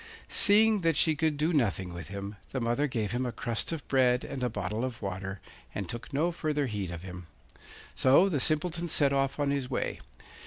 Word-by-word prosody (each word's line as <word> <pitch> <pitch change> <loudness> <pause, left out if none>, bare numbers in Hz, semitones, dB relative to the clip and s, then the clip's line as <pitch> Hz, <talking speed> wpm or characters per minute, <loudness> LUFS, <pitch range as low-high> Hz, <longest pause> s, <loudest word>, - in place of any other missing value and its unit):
Seeing 215 0 +5
that 165 -2 +2
she 155 +2 +3
could 155 0 0
do 155 +4 +1
nothing 95 - 0
with 85 -3 -7
him, 100 +2 -6
the 130 - -3
mother 120 +5 +1
gave 110 -6 -2
him 120 +2 -1
a 125 - -2
crust 115 +3 -3
of 160 -4 -5
bread 125 -2 +3
and 130 - -6
a 125 - +1
bottle 105 +2 -3
of 125 -2 -4
water, 95 -1 -5 0.4
and 100 -3 -3
took 120 +7 -7
no 155 +5 +1
further 150 -3 -1
heed 105 -6 -3
of 85 0 -7
him. 90 -2 -9 0.7
So 140 +9 +5
the 160 -7 0
Simpleton 165 +4 0
set 140 -2 +2
off 135 +1 0
on 145 -1 +1
his 140 -3 -2
way. 130 - -2
130 Hz, 205 wpm, -29 LUFS, 105-150 Hz, 0.7 s, Seeing